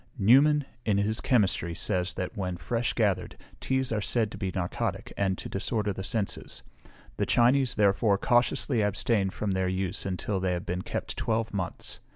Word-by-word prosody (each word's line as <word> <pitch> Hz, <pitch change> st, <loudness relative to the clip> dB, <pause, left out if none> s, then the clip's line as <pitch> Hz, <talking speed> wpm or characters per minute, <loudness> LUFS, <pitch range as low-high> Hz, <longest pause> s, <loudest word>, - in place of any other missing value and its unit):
_ -, -, -33 dB
Newman, 140 Hz, +7 st, +5 dB, 0.2 s
in 105 Hz, -4 st, +1 dB
his 105 Hz, +2 st, 0 dB
Chemistry, 95 Hz, -, +1 dB
says, 90 Hz, +1 st, -1 dB, 0.2 s
when 90 Hz, -5 st, -3 dB
fresh 115 Hz, +7 st, -1 dB
gathered, 100 Hz, -6 st, 0 dB, 0.2 s
teas 130 Hz, -1 st, 0 dB
are 110 Hz, -2 st, 0 dB
said 110 Hz, 0 st, +1 dB
to -, -, -8 dB
be 95 Hz, -, -1 dB
narcotic, 90 Hz, -1 st, -3 dB
and 95 Hz, -2 st, 0 dB
to -, -, -7 dB
disorder 105 Hz, +1 st, -2 dB
the 95 Hz, -, -6 dB
senses; 100 Hz, +1 st, -3 dB, 0.5 s
the -, -, +1 dB
Chinese, 125 Hz, +2 st, +3 dB
therefore, 100 Hz, 0 st, +3 dB
cautiously 120 Hz, +2 st, +2 dB
abstain 105 Hz, 0 st, +1 dB
from 100 Hz, +1 st, -3 dB
their 95 Hz, 0 st, 0 dB
use 95 Hz, +1 st, -1 dB
until 95 Hz, +1 st, -2 dB
they 95 Hz, -1 st, 0 dB
have 90 Hz, -, -4 dB
been 90 Hz, +1 st, -2 dB
kept -, -, -5 dB
twelve 110 Hz, 0 st, -1 dB
months. 95 Hz, -3 st, -4 dB
100 Hz, 175 wpm, -28 LUFS, 95-115 Hz, 0.5 s, Newman